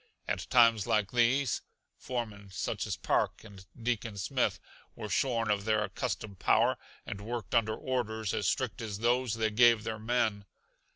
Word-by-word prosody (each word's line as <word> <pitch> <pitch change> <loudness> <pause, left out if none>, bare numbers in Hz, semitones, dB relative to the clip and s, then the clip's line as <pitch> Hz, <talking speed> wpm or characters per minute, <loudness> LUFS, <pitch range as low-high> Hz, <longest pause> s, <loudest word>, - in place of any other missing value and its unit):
At 95 -3 -3
times 115 -4 +5
like 105 -3 +1
these, 125 +2 +2 0.3
foremen 110 -5 -5
such 95 - -3
as - - -2
Park - - 0
and 100 -4 -12 0.2
Deacon 115 -2 -2
Smith 95 - 0 0.4
were 105 - -6
shorn 115 0 +1
of 100 -1 0
their 110 0 +2
accustomed 105 -3 -4
power, - - +3 0.3
and 100 0 -6
worked 115 -2 -5
under 110 -2 +2
orders 110 -5 -2
as - - 0
strict - - -1
as 105 -3 -4
those 120 +1 +1
they 110 -1 0
gave 115 0 +5
their 110 -1 -4
men. 110 -3 0
110 Hz, 160 wpm, -31 LUFS, 105-120 Hz, 0.4 s, times